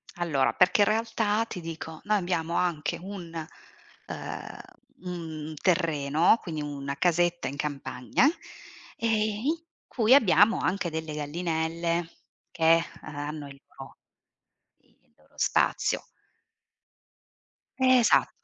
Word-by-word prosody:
Allora 145 Hz, -8 st, +1 dB
perché 195 Hz, +3 st, +4 dB
in -, -, +5 dB
realtà 225 Hz, 0 st, +1 dB
ti 180 Hz, -, -6 dB
dico, 160 Hz, -1 st, -7 dB
noi 210 Hz, 0 st, +3 dB
abbiamo 170 Hz, -3 st, -2 dB
anche 170 Hz, -5 st, 0 dB
un 185 Hz, -3 st, -8 dB, 0.8 s
ehm, -, -, -7 dB, 0.4 s
un 160 Hz, -4 st, -6 dB
terreno, 165 Hz, +1 st, +3 dB
quindi 160 Hz, -5 st, -5 dB
una 140 Hz, -1 st, -5 dB
casetta 175 Hz, -2 st, +1 dB
in 135 Hz, -, -5 dB
campagna, 140 Hz, -, -1 dB, 0.7 s
ehm, 230 Hz, -, 0 dB, 0.4 s
in 315 Hz, -, +2 dB, 0.3 s
cui 230 Hz, 0 st, +3 dB
abbiamo 215 Hz, -2 st, +5 dB
anche 185 Hz, -1 st, -1 dB
delle 160 Hz, -1 st, -5 dB
gallinelle 165 Hz, +2 st, -2 dB, 0.4 s
che 165 Hz, 0 st, +4 dB, 0.2 s
ha 145 Hz, -1 st, -6 dB
hanno 150 Hz, -1 st, -6 dB
il 140 Hz, 0 st, -12 dB, 0.2 s
loro -, -, -11 dB, 0.9 s
il -, -, -35 dB
loro -, -, -28 dB
spazio. -, -, +1 dB, 1.8 s
Esa 255 Hz, -2 st, +5 dB
170 Hz, 110 wpm, -27 LUFS, 150-185 Hz, 1.8 s, in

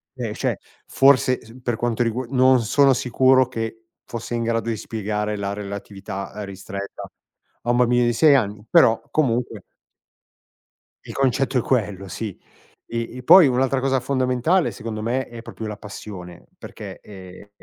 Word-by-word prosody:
Eh, -, -, -4 dB
cioè, -, -, -1 dB, 0.3 s
forse 135 Hz, -2 st, +4 dB
s 115 Hz, +3 st, -14 dB
per 120 Hz, -2 st, 0 dB
quanto 120 Hz, +1 st, 0 dB
rigu 120 Hz, +3 st, -2 dB
non 130 Hz, -1 st, +4 dB
sono 135 Hz, +5 st, +4 dB
sicuro 130 Hz, +1 st, +3 dB
che 115 Hz, -2 st, -5 dB, 0.2 s
fosse 120 Hz, 0 st, -5 dB
in 115 Hz, -, -1 dB
grado 115 Hz, 0 st, -1 dB
di 115 Hz, -, -1 dB
spiegare 105 Hz, -1 st, -3 dB
la 100 Hz, 0 st, -3 dB
relatività 100 Hz, -1 st, -6 dB
ristretta 100 Hz, 0 st, -7 dB, 0.6 s
a 120 Hz, -, +1 dB
un 120 Hz, -, +2 dB
bambino 125 Hz, 0 st, +3 dB
di 120 Hz, -, +2 dB
6 145 Hz, +4 st, +5 dB
anni, 105 Hz, -4 st, -1 dB
però, 115 Hz, 0 st, +5 dB
comunque 120 Hz, -7 st, 0 dB, 1.4 s
il -, -, -9 dB
concetto 130 Hz, 0 st, +1 dB
è -, -, +3 dB
quello 105 Hz, -6 st, -1 dB
sì. 105 Hz, 0 st, -6 dB, 0.5 s
E 115 Hz, +1 st, -5 dB
e 125 Hz, -, -8 dB
poi 180 Hz, +3 st, +8 dB
un'altra 130 Hz, +1 st, +1 dB
cosa 135 Hz, 0 st, +1 dB
fondamentale 130 Hz, +5 st, +1 dB
secondo 110 Hz, 0 st, -6 dB
me, 125 Hz, +4 st, -1 dB
è 120 Hz, -1 st, -10 dB
proprio 110 Hz, -1 st, -7 dB
la 105 Hz, -, -6 dB
passione 100 Hz, -4 st, -10 dB
perché, -, -, -9 dB
ehm, 95 Hz, 0 st, -12 dB
115 Hz, 155 wpm, -22 LUFS, 105-130 Hz, 1.4 s, poi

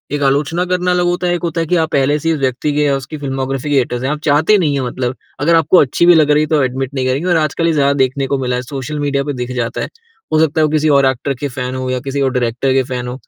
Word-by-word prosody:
एक 145 Hz, -, -2 dB
आलोचना 150 Hz, +6 st, +1 dB
करना 180 Hz, 0 st, 0 dB
अलग 180 Hz, 0 st, +1 dB
होता 175 Hz, 0 st, 0 dB
है 175 Hz, -, +1 dB
एक -, -, -5 dB
होता 165 Hz, 0 st, -1 dB
है 165 Hz, -, -3 dB
कि 180 Hz, -, +1 dB
आप 160 Hz, -, -3 dB
पहले 140 Hz, +2 st, +2 dB
से 165 Hz, -, -2 dB
ही -, -, +3 dB
उस -, -, -5 dB
व्यक्ति 130 Hz, +3 st, -1 dB
के 150 Hz, -, 0 dB
या 140 Hz, -1 st, +2 dB
उसकी 135 Hz, +3 st, -8 dB
फ़िल्मोग्राफ़ी 135 Hz, 0 st, -3 dB
के 140 Hz, -, +3 dB
हेटर्स 125 Hz, -1 st, -1 dB
आप 150 Hz, 0 st, -2 dB
चाहते 160 Hz, +8 st, +3 dB
नहीं 155 Hz, -6 st, +1 dB
हैं 140 Hz, -, -1 dB
मतलब 125 Hz, 0 st, -3 dB, 0.2 s
अगर 165 Hz, +4 st, +3 dB
आपको 165 Hz, +3 st, +4 dB
अच्छी 150 Hz, +3 st, +3 dB
भी 175 Hz, -, +7 dB
लग 150 Hz, -2 st, +4 dB
रही 150 Hz, +1 st, +3 dB
है -, -, -2 dB
तो 150 Hz, -2 st, +2 dB
एडमिट 130 Hz, +1 st, -3 dB
नहीं 130 Hz, -2 st, -2 dB
करेंगे 140 Hz, +7 st, -1 dB
और 170 Hz, -, +3 dB
आजकल 155 Hz, +2 st, 0 dB
ये 165 Hz, -, +2 dB
ज़्यादा 140 Hz, -1 st, +2 dB
देखने 135 Hz, +1 st, -2 dB
को 140 Hz, +1 st, 0 dB
मिला 125 Hz, -1 st, -1 dB
है 125 Hz, -, -2 dB
सोशल 140 Hz, +3 st, -6 dB
मीडिया 140 Hz, -1 st, 0 dB
पे 145 Hz, 0 st, -3 dB
दिख 125 Hz, 0 st, -5 dB
जाता 120 Hz, -1 st, -2 dB
है। -, -, -3 dB, 0.5 s
हो 155 Hz, -, +4 dB
सकता 160 Hz, 0 st, +2 dB
है -, -, +4 dB
वो 150 Hz, -, 0 dB
किसी 155 Hz, 0 st, +1 dB
और 135 Hz, -, +3 dB
एक्टर 130 Hz, +2 st, 0 dB
के 145 Hz, -, -2 dB
फैन 125 Hz, 0 st, -4 dB
हो 130 Hz, 0 st, -3 dB
या 130 Hz, 0 st, -1 dB
किसी 140 Hz, +1 st, -3 dB
और 135 Hz, -1 st, +1 dB
डायरेक्टर 125 Hz, +2 st, 0 dB
के 135 Hz, 0 st, +2 dB
फैन 125 Hz, -1 st, -3 dB
हो। 125 Hz, -, -4 dB
140 Hz, 310 wpm, -16 LUFS, 130-155 Hz, 0.5 s, भी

